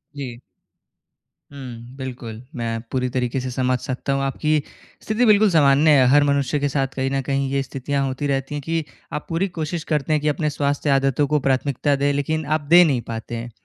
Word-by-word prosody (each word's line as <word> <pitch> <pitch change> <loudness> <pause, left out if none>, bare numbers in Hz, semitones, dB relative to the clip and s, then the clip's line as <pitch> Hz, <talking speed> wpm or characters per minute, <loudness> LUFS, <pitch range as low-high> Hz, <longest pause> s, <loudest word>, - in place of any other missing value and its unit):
जी। 125 -4 -6 1.1
हुँ, 125 -2 -9
बिल्कुल 120 -4 -7
मैं 115 -2 -2
पूरी 125 -1 0
तरीके 125 +1 -1
से 130 - -4
समझ 130 0 0
सकता 130 +2 -3
हूँ 135 - 0
आपकी 150 +3 0 0.4
स्थिति 220 +3 +1
बिल्कुल 215 -1 +5
सामान्य 150 -1 +5
है 130 - +5
हर 145 +2 +6
मनुष्य 140 0 +1
के 145 0 0
साथ 135 -1 0
कहीं 135 0 -1
न 135 0 0
कहीं 135 +1 -1
ये 140 0 +1
स्थितियाँ 135 +1 -2
होती 135 +2 -2
रहती 135 +1 -2
हैं 145 - -3
कि 165 0 -1 0.3
आप 150 - -4
पूरी 165 +4 0
कोशिश 160 +1 -3
करते 150 0 +1
हैं 150 - +1
कि 150 - -1
अपने 150 +1 0
स्वास्थ्य 145 0 -1
आदतों 135 +1 +2
को 150 +1 +2
प्राथमिकता 140 +1 +1
दें, 140 +1 +1
लेकिन 155 +2 -1
आप 155 +1 0
दे 170 +5 +7
नहीं 140 -8 +1
पाते 115 +1 -5
हैं, 120 +1 -6
140 Hz, 200 wpm, -22 LUFS, 130-150 Hz, 1.1 s, दे